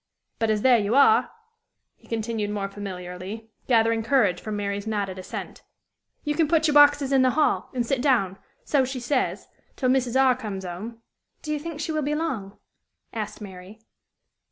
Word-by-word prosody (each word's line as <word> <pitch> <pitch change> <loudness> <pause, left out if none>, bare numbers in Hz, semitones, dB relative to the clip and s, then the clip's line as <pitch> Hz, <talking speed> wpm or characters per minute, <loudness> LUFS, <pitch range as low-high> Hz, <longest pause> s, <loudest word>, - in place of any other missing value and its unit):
But, 225 - +1
as 215 -1 +1
there 250 -3 +6
you 210 +3 0
are," 435 +11 +5 0.7
he - - -23
continued 225 -2 -2
more 205 -1 -2
familiarly, 195 +2 -7 0.2
gathering 230 -2 +3
courage 220 -7 +2
from 215 -1 -4
Mary's 200 0 -3
nodded 200 -3 -2
assent, 185 - -7 0.6
"you 295 - 0
can 320 0 +2
put 320 0 +2
your 300 - +3
boxes 290 -1 +6
in 270 -1 +4
the 260 - +4
hall, 310 - +2
and 240 -1 0
sit 260 +1 0
down, 215 -9 +1 0.4
she 260 0 -4
says, 255 +2 -1 0.3
till 255 - 0
Mrs. 255 -1 +2
R. 260 -2 +5
comes 205 -6 -6
'ome." 220 +7 -7 0.4
"Do 305 - -2
you 300 - -2
think 320 0 -7
she 315 - -2
will 310 -1 0
be 295 +1 -1
long?" 230 -12 -3 0.6
asked 215 -1 -5
Mary. 190 +1 -10
230 Hz, 175 wpm, -25 LUFS, 205-275 Hz, 0.7 s, there